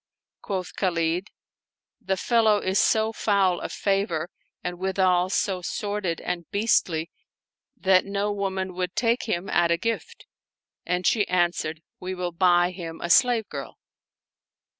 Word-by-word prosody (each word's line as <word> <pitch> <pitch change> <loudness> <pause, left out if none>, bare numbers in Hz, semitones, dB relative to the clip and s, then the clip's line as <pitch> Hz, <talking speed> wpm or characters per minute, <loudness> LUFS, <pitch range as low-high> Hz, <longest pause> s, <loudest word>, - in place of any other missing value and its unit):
Quoth 185 -2 -4
Khalid, 175 0 0 0.7
"The 190 0 -1
fellow 220 0 +3
is 190 -1 0
so 220 0 +2
foul 195 -5 +2
of - - -5
favor 195 -5 -1 0.3
and 180 0 -4
withal 185 -1 +2
so 190 -1 0
sordid 205 -2 -2
and 175 -2 -4
beastly 180 -6 +1 0.7
that 190 -4 +4
no 200 +1 -1
woman 190 -2 -2
would 180 0 -3
take 235 +1 +1
him 180 -1 -1
at 175 -1 +2
a 170 - +3
gift" 230 +6 -4 0.6
And 180 +1 -1
she 210 -3 +3
answered, 170 -3 0
" - - -64
We 185 +1 -4
will 180 -1 -3
buy 175 0 +3
him 165 -3 -7
a 170 - -2
slave 240 -3 +4
girl." 140 -2 -7
185 Hz, 140 wpm, -25 LUFS, 175-200 Hz, 0.7 s, that